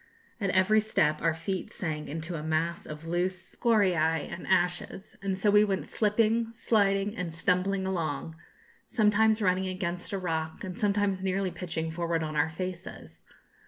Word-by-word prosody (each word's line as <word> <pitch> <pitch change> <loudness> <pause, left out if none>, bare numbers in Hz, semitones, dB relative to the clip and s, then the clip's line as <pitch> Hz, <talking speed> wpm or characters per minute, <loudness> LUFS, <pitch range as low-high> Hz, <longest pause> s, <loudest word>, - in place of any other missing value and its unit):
At 200 -3 0
every 190 +4 +4
step 155 -8 +1
our 165 0 +2
feet 185 +3 -4
sank 155 -4 -4
into 160 +4 -4
a 160 - -3
mass 160 +2 -1
of 150 +1 -8
loose 175 +2 -2
scoriæ 180 - +2
and 175 - -7
ashes; 180 +2 0
and 195 -1 -1
so 205 +2 +3
we 210 +1 +6
went 195 -3 -1
slipping, 225 +2 +1
sliding, 205 -2 +1
and 180 -4 -3
stumbling 185 +4 +1
along, 165 -4 -2 0.5
sometimes 220 0 +3
running 185 0 +2
against 180 -1 -3
a 200 - -1
rock, 160 -3 -3
and 185 -2 -5
sometimes 205 -3 +1
nearly 190 0 0
pitching 165 -2 -4
forward 165 0 -1
on 155 -1 -4
our 150 +2 +2
faces. 170 - -7
185 Hz, 160 wpm, -29 LUFS, 165-200 Hz, 0.5 s, we